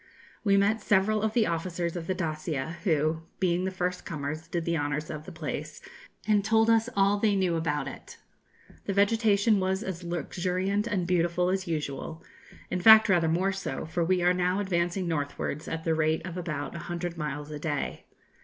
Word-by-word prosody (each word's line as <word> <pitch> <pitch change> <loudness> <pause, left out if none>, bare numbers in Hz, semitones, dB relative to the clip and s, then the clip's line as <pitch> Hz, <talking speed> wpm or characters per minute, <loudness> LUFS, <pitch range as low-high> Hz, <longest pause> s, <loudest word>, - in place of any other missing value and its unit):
We 200 -2 +4
met 210 +2 +2
several 210 +2 +2
of 220 0 0
the 225 -2 +3
officers 170 0 -2
of 170 -2 -5
the 185 - 0
'Dacia,' 155 -2 -3
who, 155 -2 +1 0.2
being 180 -1 +1
the - - 0
first 180 -1 -3
comers, 155 +1 -5
did 170 -1 -3
the 170 - 0
honours 145 0 -2
of 155 0 -7
the - - -7
place, 160 -3 -5 0.5
and 210 -2 +3
told 220 +2 +4
us 225 +1 +3
all 200 +1 +3
they 210 -1 +2
knew 185 -3 +1
about 160 -3 -1
it. - - -9 0.7
The 200 - -1
vegetation 205 +1 +3
was 190 +1 0
as 180 -2 -5
luxuriant 180 +5 -1
and 195 -6 -1
beautiful 175 0 +1
as 190 0 -1
usual 155 0 -4 0.5
in 180 - -1
fact, 220 +1 +8
rather 175 -3 +4
more 185 +4 +1
so; 190 -8 -4
for 165 +2 -1
we 180 +1 +1
are 180 +1 +4
now 180 +1 +1
advancing 175 -1 0
northwards 145 -1 -3
at 165 0 -4
the 165 - +1
rate 155 +1 +1
of 180 -2 -6
about 155 -6 -4
a 170 - -6
hundred 175 0 -3
miles 150 -2 -4
a 150 - -5
day. 145 -3 -3
175 Hz, 190 wpm, -28 LUFS, 160-195 Hz, 0.7 s, fact